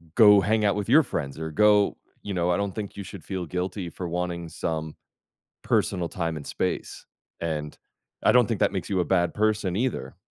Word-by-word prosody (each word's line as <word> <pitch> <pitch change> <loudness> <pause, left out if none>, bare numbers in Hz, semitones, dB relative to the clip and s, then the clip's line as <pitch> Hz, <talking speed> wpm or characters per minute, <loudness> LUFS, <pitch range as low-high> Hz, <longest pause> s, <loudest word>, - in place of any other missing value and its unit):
go 105 -3 +8
hang 110 +1 +2
out 100 -1 +3
with 105 +1 -3
your 155 +5 +7
friends 70 - -4
or 80 0 -3
go 105 +4 +4 0.3
you 100 - -4
know 90 0 0
I 85 - +2
don't 100 -1 -2
think 105 -2 -6
you 100 - -5
should 95 -3 -10
feel 95 -3 -4
guilty 90 +2 -3
for 85 +1 -6
wanting 85 -1 -3
some 80 -1 -4 0.7
personal 90 -3 0
time 85 -3 -3
and 75 - -8
space, - - -3 0.3
and 75 -3 -3 0.5
I - - +6
don't 125 -2 +5
think 115 - -2
that - - +3
makes 95 - -4
you 95 -2 +1
a - - +2
bad 85 0 +1
person 105 -4 +1
either. 125 +3 -2
95 Hz, 205 wpm, -26 LUFS, 85-105 Hz, 0.7 s, go